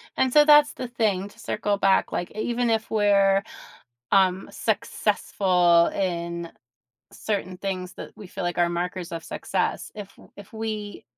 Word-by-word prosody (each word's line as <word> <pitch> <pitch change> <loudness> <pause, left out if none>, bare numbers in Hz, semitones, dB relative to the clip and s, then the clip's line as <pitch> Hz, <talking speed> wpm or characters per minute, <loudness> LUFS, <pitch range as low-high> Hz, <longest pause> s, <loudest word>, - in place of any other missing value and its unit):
And 260 -1 +1
so 295 +1 +6
that's 295 -1 +6
the 250 - -6
thing, 210 -5 0
to - - -18
circle 205 -1 -1
back, 195 -1 +2
like, 175 - -3
e 215 - -8
even 240 0 0
if 225 0 0
we're, 200 -2 +3 0.7
um, 190 -1 +3
successful 175 -3 +2
in 170 -2 -3 0.6
certain 195 -3 -3
things 185 -1 -4
that - - -9
we 205 - -10
feel, 185 +1 -6
like, 175 0 -2
are 175 0 +3
markers 175 +1 -4
of 165 -1 -5
success. - - -2
If 205 -2 -10 0.2
if 205 +1 -13
we 215 -2 -5
195 Hz, 155 wpm, -25 LUFS, 180-215 Hz, 0.7 s, so